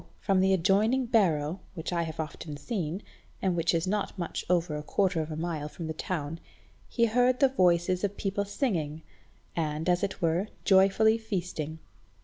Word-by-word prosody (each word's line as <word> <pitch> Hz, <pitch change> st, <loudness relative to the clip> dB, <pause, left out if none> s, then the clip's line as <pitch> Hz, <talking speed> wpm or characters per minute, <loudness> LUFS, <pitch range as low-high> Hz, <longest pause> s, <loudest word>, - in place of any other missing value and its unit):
from 195 Hz, -2 st, +2 dB
the 190 Hz, +1 st, +4 dB
adjoining 205 Hz, +8 st, +3 dB
barrow, 175 Hz, -8 st, +2 dB, 0.2 s
which 165 Hz, +1 st, -4 dB
I 170 Hz, -, +1 dB
have 160 Hz, -1 st, -5 dB
often 155 Hz, -1 st, -5 dB
seen, 185 Hz, -1 st, -3 dB, 0.4 s
and 185 Hz, -2 st, 0 dB
which 170 Hz, 0 st, +2 dB
is 165 Hz, -1 st, 0 dB
not 205 Hz, +1 st, -2 dB
much 175 Hz, -2 st, -3 dB
over 175 Hz, -3 st, +1 dB
a 150 Hz, -, -3 dB
quarter 180 Hz, +2 st, +1 dB
of 155 Hz, -, -5 dB
a 155 Hz, -, -4 dB
mile 160 Hz, -2 st, -3 dB
from 165 Hz, -, -7 dB
the 160 Hz, -, -3 dB
town, 165 Hz, -2 st, -4 dB, 0.5 s
he 235 Hz, -, +2 dB
heard 245 Hz, +3 st, +3 dB
the 275 Hz, -2 st, +5 dB
voices 180 Hz, -5 st, +2 dB
of 205 Hz, 0 st, -1 dB
people 200 Hz, 0 st, -1 dB
singing, 165 Hz, -, -2 dB, 0.5 s
and, 155 Hz, 0 st, -2 dB
as 180 Hz, 0 st, +3 dB
it 200 Hz, -2 st, -2 dB
were, 170 Hz, +3 st, +1 dB, 0.2 s
joyfully 200 Hz, +3 st, +5 dB
feasting. 175 Hz, -7 st, -4 dB
180 Hz, 175 wpm, -29 LUFS, 160-200 Hz, 0.5 s, the